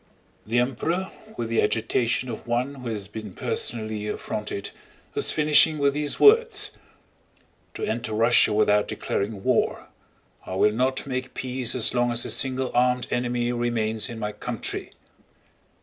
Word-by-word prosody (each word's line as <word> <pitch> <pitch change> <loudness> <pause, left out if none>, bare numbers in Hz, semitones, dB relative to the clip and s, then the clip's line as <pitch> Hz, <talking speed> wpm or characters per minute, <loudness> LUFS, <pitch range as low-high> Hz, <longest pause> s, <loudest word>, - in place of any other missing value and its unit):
The 115 +2 0
Emperor, 155 +10 -1 0.3
with 115 - -2
the 115 - +2
agitation 115 +3 0
of 115 - -7
one 120 +4 -1
who 130 -3 -8
has 105 -4 -3
been 105 -2 -8
personally 110 -2 -2
affronted, 105 -1 -4 0.4
was - - +3
finishing 155 0 +4
with 140 -1 +2
these 145 0 -2
words: 425 -1 +5 1.0
"To - - -5
enter 115 0 -3
Russia 115 0 +4
without 105 0 +3
declaring 100 -1 -3
war! - - 0 0.5
I 95 - -6
will 105 +2 +4
not 130 +3 0
make 130 -1 -4
peace 130 -1 -2
as 125 - +4
long 120 -1 +1
as 120 0 +1
a - - -2
single 130 -1 -1
armed 125 0 +2
enemy 120 0 0
remains 120 -2 -1
in 115 - -7
my 105 -1 -3
country!" 105 - -4
120 Hz, 150 wpm, -25 LUFS, 110-130 Hz, 1.0 s, words